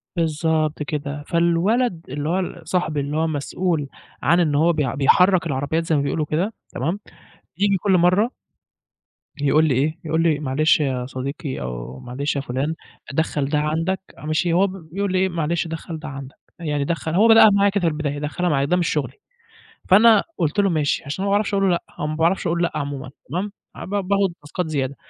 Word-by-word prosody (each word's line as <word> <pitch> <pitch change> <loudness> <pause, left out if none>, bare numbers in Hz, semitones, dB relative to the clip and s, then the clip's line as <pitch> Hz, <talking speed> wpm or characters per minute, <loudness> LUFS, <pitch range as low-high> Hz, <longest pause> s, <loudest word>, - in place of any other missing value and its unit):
بالضبط 155 -2 0
كده. 145 -1 -4
فالولد 170 +4 +1
اللي 145 +3 -3
هو 180 +3 +1
ال 180 -1 -5
صاحبي 160 -4 0
اللي 145 +2 -2
هو 160 +1 +1
مسؤول 155 +1 -1 0.3
عن 170 +3 +3
إن 155 -4 +2
هو 165 +4 +4
بي 145 -6 -1
بيحرّك 180 +6 +4
العربيّات 145 +3 -1
زي 160 - +1
ما 145 - +2
بيقولوا 150 +2 -1
كده، 175 +9 -1 0.2
تمام، 165 +10 -2 0.6
بييجي 200 0 +2
كل 190 +2 0
مرّة 185 +7 +3 1.1
يقول 150 +2 +4
لي 145 - +2
إيه، 155 +5 0
يقول 160 +1 0
لي: 160 -3 +2
"معلش 150 +3 +2
يا 130 -4 -1
صديقي 135 - -5
أو 60 +1 -6
معلش 140 +5 -3
يا 140 - -1
فُلان، 135 +4 -2 0.4
دخّل 150 -1 0
ده 150 - +1
عندك." 165 +5 -1 0.2
ماشي، 155 +3 0
هو 190 +3 +4
ب 185 - -6 0.2
بيقول 195 +1 -1
إيه: 190 +1 +2
"معلش 170 0 -1
دخّل 165 0 -6
ده 155 - -8
عندك." 135 -1 -8 0.2
يعني 150 -4 -1
دخّل 165 0 -2
هو 220 +4 +5
بدأها 225 -1 +8
معايا 200 0 +4
كده 200 -1 -1
في 170 - +2
البداية، 150 -2 -2
"دخّلها 175 +4 -1
معايا." 140 -2 +2
ده 180 +5 +2
مش 175 - +1
شُغلي. 135 -4 -1 0.8
فأنا 215 +2 +7
قُلت 165 +4 0
له: 200 - +4
"ماشي." 155 -4 0
عشان 145 +8 -4
ما - - 0
باعرفش 205 0 +1
أقول 195 -1 +2
له - - +3
لأ، 170 - 0 0.2
أو 150 - -1
ما 155 - -3
باعرفش 170 +3 +1
أقول 170 +1 0
لأ 170 - 0
عمومًا 140 -3 -4 0.2
تمام، 185 +8 -2 0.2
ع - - -7
ب - - -10
باخُد 200 -1 +1
تاسكات 160 +4 -4
زيادة. 140 -3 -2
160 Hz, 200 wpm, -22 LUFS, 145-180 Hz, 1.1 s, بدأها